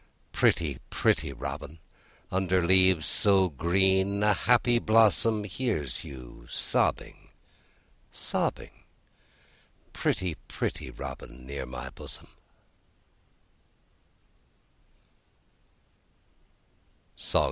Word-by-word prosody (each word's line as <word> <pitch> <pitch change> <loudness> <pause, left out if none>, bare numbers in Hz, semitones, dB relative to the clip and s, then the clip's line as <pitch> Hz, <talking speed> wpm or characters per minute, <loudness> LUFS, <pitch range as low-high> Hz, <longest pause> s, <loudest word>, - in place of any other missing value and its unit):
Pretty, 75 -7 +1
pretty 75 -3 +1
robin! 70 +4 -6 0.5
Under 95 -1 +1
leaves 95 -3 +4
so 95 -2 +3
green 95 +6 +1
A 105 0 +5
happy 120 +3 +3
blossom 110 -1 +3
Hears 100 - -3
you 60 -2 -11
sobbing, - - -1 0.8
sobbing, - - -1 1.1
Pretty, 90 -3 -1
pretty - - -4
robin, 65 +1 -9
Near 70 -1 -5
my - - -7
bosom. - - -11
95 Hz, 70 wpm, -28 LUFS, 70-100 Hz, 1.1 s, A